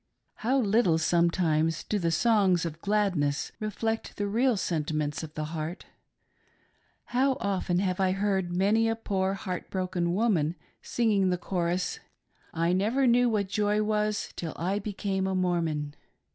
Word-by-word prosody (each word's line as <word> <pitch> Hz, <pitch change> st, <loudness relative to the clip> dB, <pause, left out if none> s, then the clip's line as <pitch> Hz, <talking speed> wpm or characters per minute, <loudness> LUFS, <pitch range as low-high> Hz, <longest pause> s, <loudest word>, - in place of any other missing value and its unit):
How 255 Hz, +5 st, +1 dB
little 205 Hz, -7 st, +3 dB
sometimes 165 Hz, -1 st, +1 dB
do 210 Hz, -, -1 dB
the 170 Hz, -2 st, 0 dB
songs 190 Hz, -1 st, +3 dB
of 165 Hz, 0 st, -6 dB
gladness 195 Hz, -9 st, 0 dB
reflect 225 Hz, +1 st, -3 dB
the 205 Hz, -, -1 dB
real 230 Hz, +3 st, +2 dB
sentiments 155 Hz, -4 st, -1 dB
■of 160 Hz, -1 st, -9 dB
'the 155 Hz, -, -2 dB
heart. 160 Hz, +3 st, -5 dB, 1.3 s
How 265 Hz, +2 st, +3 dB
oftdn 195 Hz, -6 st, -1 dB
have 185 Hz, -1 st, -1 dB
I 190 Hz, -1 st, +2 dB
heard 195 Hz, -2 st, 0 dB
many 205 Hz, +5 st, +2 dB
a 225 Hz, -, 0 dB
poor 195 Hz, -3 st, -1 dB
heart 185 Hz, -2 st, -5 dB
'broken 180 Hz, -2 st, -1 dB
woman 180 Hz, -8 st, +1 dB, 0.3 s
singing 210 Hz, -5 st, +1 dB
the 180 Hz, -, +1 dB
chorus: 175 Hz, 0 st, -2 dB, 0.3 s
" -, -, -34 dB
I 165 Hz, +2 st, +1 dB
never 220 Hz, +9 st, +2 dB
knew 245 Hz, 0 st, +4 dB
what 210 Hz, -3 st, 0 dB
joy 210 Hz, +1 st, +1 dB
was 210 Hz, -1 st, -1 dB
Till 165 Hz, -2 st, -4 dB
I 190 Hz, +4 st, -1 dB
became 195 Hz, -2 st, -2 dB
a 190 Hz, -, -1 dB
Mormon." 165 Hz, -5 st, 0 dB
190 Hz, 150 wpm, -28 LUFS, 170-210 Hz, 1.3 s, knew